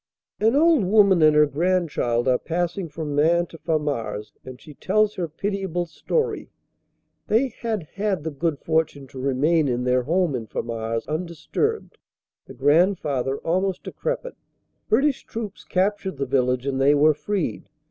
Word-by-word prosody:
An 225 Hz, +4 st, +3 dB
old 315 Hz, -4 st, +4 dB
woman 195 Hz, -2 st, +4 dB
and 155 Hz, -1 st, +6 dB
her 150 Hz, 0 st, +6 dB
grandchild 150 Hz, -7 st, 0 dB
are 125 Hz, -1 st, +3 dB
passing 175 Hz, +1 st, -2 dB
from 150 Hz, -1 st, -5 dB
Maing 170 Hz, +4 st, +3 dB
to 165 Hz, -, -12 dB
Famars 145 Hz, -10 st, -2 dB
and 130 Hz, -1 st, -10 dB
she 150 Hz, -, -13 dB
tells 210 Hz, +7 st, +1 dB
her 175 Hz, -2 st, -3 dB
pitiable 190 Hz, +1 st, -3 dB
story. 460 Hz, -, -2 dB, 0.8 s
They 245 Hz, +5 st, +2 dB
had 225 Hz, -6 st, -4 dB
had 200 Hz, -5 st, -1 dB
the 160 Hz, -, -3 dB
good 150 Hz, +1 st, -1 dB
fortune 160 Hz, -3 st, -1 dB
to 130 Hz, -, -9 dB
remain 140 Hz, +4 st, +2 dB
in 125 Hz, -1 st, -1 dB
their 125 Hz, 0 st, +2 dB
home 170 Hz, +4 st, +1 dB
in 115 Hz, -3 st, -5 dB
Famars 115 Hz, 0 st, -3 dB
undisturbed 170 Hz, -, -3 dB, 0.5 s
the 135 Hz, -, -11 dB
grandfather 145 Hz, -2 st, +2 dB
almost 185 Hz, +2 st, -1 dB
decrepit. -, -, -4 dB, 0.6 s
British 270 Hz, +4 st, +2 dB
troops 215 Hz, -3 st, -7 dB
captured 190 Hz, -2 st, -1 dB
the 140 Hz, -, -1 dB
village 125 Hz, -1 st, +1 dB
and 135 Hz, -1 st, -1 dB
they 140 Hz, +2 st, +5 dB
were 150 Hz, +2 st, +5 dB
freed. 195 Hz, +4 st, -3 dB
165 Hz, 150 wpm, -23 LUFS, 140-195 Hz, 0.8 s, and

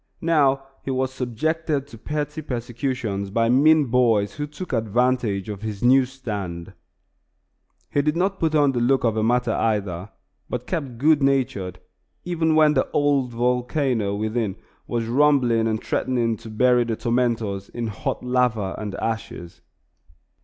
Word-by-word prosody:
Now 140 Hz, -5 st, +3 dB, 0.2 s
he -, -, -5 dB
was 130 Hz, 0 st, -1 dB
subjected 145 Hz, +4 st, -1 dB
to 130 Hz, -5 st, -13 dB
petty 150 Hz, +3 st, -3 dB
persecutions 120 Hz, -5 st, -3 dB
by 115 Hz, +3 st, +1 dB
mean 150 Hz, +4 st, +5 dB
boys 115 Hz, -5 st, +2 dB
who 150 Hz, 0 st, -4 dB
took 150 Hz, +2 st, -8 dB
advantage 115 Hz, -3 st, 0 dB
of 105 Hz, -2 st, -6 dB
his 110 Hz, -2 st, -5 dB
new 130 Hz, +2 st, +5 dB
stand. 105 Hz, -10 st, -6 dB, 1.2 s
He 145 Hz, -, +2 dB
did 150 Hz, +2 st, 0 dB
not 190 Hz, +2 st, 0 dB
put 160 Hz, -1 st, +1 dB
on 145 Hz, -2 st, +4 dB
the 125 Hz, -, -1 dB
look 130 Hz, +3 st, +2 dB
of 115 Hz, -2 st, +2 dB
a 110 Hz, -, 0 dB
martyr 125 Hz, +3 st, +2 dB
either, 100 Hz, -4 st, -1 dB, 0.4 s
but 125 Hz, 0 st, -4 dB
kept 140 Hz, -9 st, -4 dB
good 150 Hz, +3 st, +4 dB
natured 120 Hz, -10 st, 0 dB, 0.5 s
even 160 Hz, -2 st, +1 dB
when 155 Hz, -1 st, +5 dB
the 130 Hz, -, +1 dB
old 145 Hz, -3 st, +1 dB
volcano 125 Hz, -2 st, 0 dB
within 110 Hz, -1 st, -1 dB, 0.3 s
was 115 Hz, -1 st, -1 dB
rumbling 125 Hz, -3 st, +3 dB
and 110 Hz, -1 st, 0 dB
threatening 120 Hz, -3 st, 0 dB
to 115 Hz, +1 st, -11 dB
bury 125 Hz, +2 st, +3 dB
the 115 Hz, -1 st, -2 dB
tormentors 115 Hz, -5 st, -1 dB
in 120 Hz, -1 st, -4 dB
hot 110 Hz, -3 st, -4 dB
lava 125 Hz, -6 st, +1 dB
and 105 Hz, -2 st, -5 dB
ashes. 110 Hz, -6 st, -5 dB
125 Hz, 150 wpm, -23 LUFS, 110-140 Hz, 1.2 s, mean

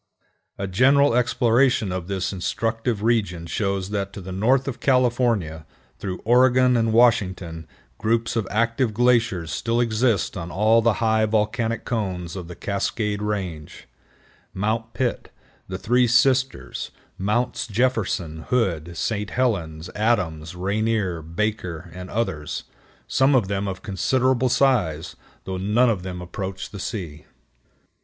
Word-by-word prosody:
A 100 Hz, -, -3 dB
general 135 Hz, +9 st, +4 dB
exploration 120 Hz, -2 st, +2 dB
of 90 Hz, -2 st, -4 dB
this 95 Hz, 0 st, -2 dB
instructive 115 Hz, +3 st, -2 dB
region 100 Hz, -8 st, +1 dB
shows 95 Hz, +2 st, -2 dB
that 100 Hz, -1 st, -2 dB
to -, -, -7 dB
the 95 Hz, +1 st, -8 dB
north 125 Hz, +8 st, +2 dB
of 135 Hz, -, -4 dB
California, 120 Hz, -, +1 dB, 0.4 s
through 95 Hz, -2 st, -4 dB
Oregon 125 Hz, +1 st, +5 dB
and 115 Hz, -1 st, +2 dB
Washington, 95 Hz, -8 st, +2 dB, 0.3 s
groups 115 Hz, +1 st, 0 dB
of 110 Hz, -4 st, -1 dB
active 115 Hz, +1 st, 0 dB
glaciers 115 Hz, -8 st, +2 dB
still 115 Hz, +10 st, -1 dB
exist 115 Hz, -3 st, +1 dB
on 85 Hz, -3 st, -5 dB
all 110 Hz, +5 st, +3 dB
the 115 Hz, 0 st, +3 dB
high 110 Hz, 0 st, +3 dB
volcanic 110 Hz, +2 st, 0 dB
cones 95 Hz, -7 st, -3 dB
of 90 Hz, -3 st, -6 dB
the 90 Hz, -, -8 dB
Cascade 105 Hz, +2 st, -2 dB
Range,—Mount 105 Hz, +3 st, -5 dB
Pitt, 125 Hz, -2 st, -2 dB, 0.4 s
the 95 Hz, -, -4 dB
Three 125 Hz, +5 st, +2 dB
Sisters, 125 Hz, -, +1 dB, 0.3 s
Mounts 105 Hz, +6 st, 0 dB
Jefferson, 105 Hz, -8 st, 0 dB
Hood, 85 Hz, -9 st, 0 dB
St. 105 Hz, -2 st, -2 dB
Helens, 90 Hz, -10 st, -1 dB
Adams, 90 Hz, -7 st, 0 dB
Rainier, 100 Hz, -1 st, -1 dB
Baker, 85 Hz, -1 st, -3 dB
and 90 Hz, +1 st, -8 dB
others,—some 115 Hz, -, -2 dB
of 115 Hz, -7 st, +3 dB
them 100 Hz, 0 st, -1 dB
of 95 Hz, -1 st, -5 dB
considerable 130 Hz, +5 st, +1 dB
size, 90 Hz, -, +1 dB, 0.3 s
though 95 Hz, -1 st, -4 dB
none 110 Hz, +6 st, +3 dB
of 100 Hz, -5 st, -2 dB
them 90 Hz, -1 st, -6 dB
approach 95 Hz, +2 st, -6 dB
the 100 Hz, -, -8 dB
sea. 85 Hz, -9 st, -5 dB
105 Hz, 130 wpm, -23 LUFS, 90-120 Hz, 0.4 s, Oregon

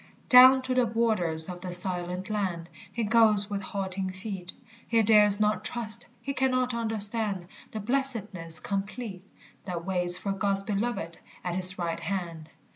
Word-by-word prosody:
Down 260 Hz, +1 st, +8 dB
to 255 Hz, -, -2 dB
the 250 Hz, -2 st, +2 dB
borders 205 Hz, -9 st, -1 dB
of 180 Hz, -1 st, -8 dB
the 185 Hz, -, -6 dB
silent 180 Hz, +1 st, -4 dB
land 180 Hz, -5 st, -3 dB, 0.2 s
He 235 Hz, -, -3 dB
goes 215 Hz, -2 st, +3 dB
with 200 Hz, -1 st, -3 dB
halting 190 Hz, -1 st, -4 dB
feet; 185 Hz, -2 st, -7 dB, 0.4 s
He 230 Hz, -1 st, +2 dB
dares 210 Hz, -1 st, +5 dB
not 210 Hz, 0 st, 0 dB
trust; 230 Hz, -1 st, -2 dB, 0.2 s
he 275 Hz, -, -3 dB
cannot 255 Hz, -2 st, 0 dB
understand 220 Hz, -4 st, +2 dB, 0.3 s
The 215 Hz, -, -5 dB
blessedness 210 Hz, -9 st, +1 dB
complete 200 Hz, +1 st, -5 dB, 0.4 s
That 175 Hz, -3 st, -5 dB
waits 180 Hz, -2 st, +3 dB
for 200 Hz, -, -4 dB
God's 195 Hz, 0 st, -1 dB
beloved 200 Hz, -5 st, -3 dB, 0.2 s
at 180 Hz, -, -3 dB
his 185 Hz, +1 st, +2 dB
right 170 Hz, -2 st, -3 dB
hand. 170 Hz, -3 st, -5 dB
200 Hz, 150 wpm, -27 LUFS, 180-225 Hz, 0.4 s, Down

